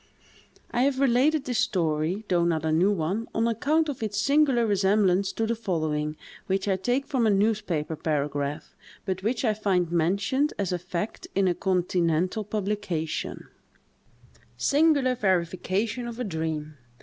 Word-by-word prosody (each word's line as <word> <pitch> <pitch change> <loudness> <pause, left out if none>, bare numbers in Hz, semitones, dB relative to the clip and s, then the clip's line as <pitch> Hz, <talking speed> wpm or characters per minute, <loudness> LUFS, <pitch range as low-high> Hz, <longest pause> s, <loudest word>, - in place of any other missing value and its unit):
I 240 - +1
have 265 0 +2
related 275 +3 +3
this 245 -3 -1
story, 165 +3 0
though 175 -2 +2
not 160 -2 0
a 160 - +1
new 175 +6 +3
one, 195 +5 -1
on 225 +1 +2
account 295 +8 +1
of 285 -5 -5
its 210 -2 -2
singular 270 -1 +3
resemblance 195 -2 +2
to 225 - -1
the 230 - 0
following, 155 -8 -2 0.3
which 190 +1 0
I 195 - +2
take 245 +8 0
from 250 -6 +1
a - - +4
newspaper 200 -7 0
paragraph, 145 -1 -2 0.3
but 190 -1 -2
which 230 +5 -1
I 220 - +3
find 190 -5 0
mentioned 195 - +1
as 195 -3 -1
a 180 - -1
fact 180 +3 -5
in 195 0 +3
a 180 - +3
continental 180 +1 0
publication:— 200 -6 -3 1.1
"SINGULAR 285 -3 +3
VERIFICATION 195 +3 -1
OF 235 0 -7
A - - -1
DREAM. 160 -5 -4
195 Hz, 150 wpm, -26 LUFS, 170-230 Hz, 1.1 s, a